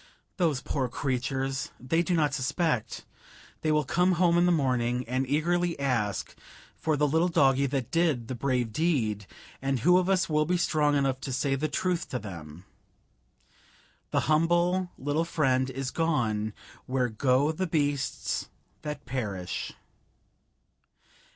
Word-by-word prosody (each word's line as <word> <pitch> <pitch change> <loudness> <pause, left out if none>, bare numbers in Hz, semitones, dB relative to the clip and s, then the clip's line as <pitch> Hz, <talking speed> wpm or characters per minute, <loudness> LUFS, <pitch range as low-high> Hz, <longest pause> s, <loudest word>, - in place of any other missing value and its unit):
"Those 160 -8 +1
poor 135 -3 -1
creatures! 135 +2 -2
They 150 +7 +1
do 175 +1 0
not 150 -3 +2
suspect. 140 -2 -1 0.6
They 155 - +1
will 150 0 +3
come 180 +6 +2
home 170 0 +3
in 175 +1 +4
the - - +4
morning, 125 -5 +1
and 130 +2 -1
eagerly 170 +4 +1
ask 120 -8 -1 0.4
for 155 -2 0
the 150 +1 +3
little 160 +4 +2
doggie 140 -5 +3
that 130 -3 -3
did 160 -9 +1
the 130 - -3
brave 125 -3 -1
deed, 110 - 0 0.3
and 135 -2 -1
who 180 +3 +5
of 185 +1 -1
us 190 -1 +2
will 150 -1 +2
be 180 +1 +2
strong 150 -4 +2
enough 135 -2 +1
to 135 - -4
say 135 +2 0
the 140 +3 0
truth 180 +3 -1
to 125 - -2
them: 85 -5 -9 1.4
'The - - +1
humble 175 +4 +2
little 145 +4 0
friend 135 -6 +1
is 130 -1 -4
gone 115 -10 0 0.3
where 130 -1 +1
go 130 +6 +2
the 185 +4 -2
beasts 145 -4 -1 0.3
that 150 -1 -6
perish.'" 105 -9 -3
140 Hz, 145 wpm, -28 LUFS, 125-165 Hz, 1.4 s, who